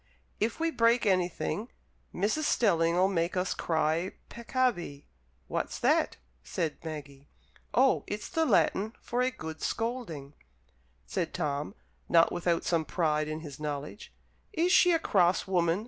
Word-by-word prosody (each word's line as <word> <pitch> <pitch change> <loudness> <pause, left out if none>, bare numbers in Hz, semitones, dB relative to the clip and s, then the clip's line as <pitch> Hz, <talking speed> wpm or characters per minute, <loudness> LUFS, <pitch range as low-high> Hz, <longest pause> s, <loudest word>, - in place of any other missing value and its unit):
If 225 +7 -1
we 330 0 +1
break 235 -2 +3
anything, 190 +4 0 0.4
Mrs. 215 - 0
Stelling'll 175 - +3
make 175 -1 -1
us 180 +1 0
cry 160 +2 0 0.2
peccavi." 235 - -1 0.4
"What's - - -3
that?" - - +2 0.3
said 165 - -3
Maggie. 145 -3 -8 0.4
"Oh, 260 +2 +3
it's 210 +1 -4
the 325 - 0
Latin 220 -5 +2
for 245 +1 -2
a 255 - +3
good 160 -9 -8
scolding," 225 - -3 0.7
said - - -3
Tom, 145 +6 -2 0.3
not 165 -1 +5
without 170 -1 0
some 165 -2 +1
pride 155 -2 0
in 155 +1 -4
his 150 -3 -9
knowledge. 150 +5 -5 0.4
"Is 350 -1 +2
she 360 - +6
a 335 - +4
cross 185 - +2
woman?" 175 -2 +1
175 Hz, 135 wpm, -29 LUFS, 160-230 Hz, 0.7 s, she